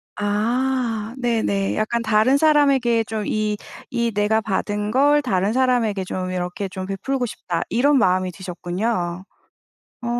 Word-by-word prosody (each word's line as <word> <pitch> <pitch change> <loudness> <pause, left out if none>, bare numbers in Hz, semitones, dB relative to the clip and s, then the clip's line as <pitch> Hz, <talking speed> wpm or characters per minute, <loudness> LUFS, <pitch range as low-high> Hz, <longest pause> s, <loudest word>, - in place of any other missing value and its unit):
아. 240 +6 0 0.3
네네. 225 -5 0
약간 225 +2 0
'다른 225 +4 +3
사람에게 275 -7 +3
좀 215 -1 -4
이, 215 0 -1 0.3
이 235 -1 0
내가 210 +2 +1
받은 210 0 -2
걸 290 +3 +4
다른 200 -4 0
사람에게 245 -6 +1
좀 185 0 -4
이렇게 180 +2 -3
좀 185 0 -6
베풀고 245 +7 -2
싶다.' 175 -6 -4
이런 275 +4 +3
마음이 185 -3 +2
드셨군요. 180 0 -3 0.8
어. 240 - -5
215 Hz, 265 characters per minute, -22 LUFS, 190-245 Hz, 0.8 s, 걸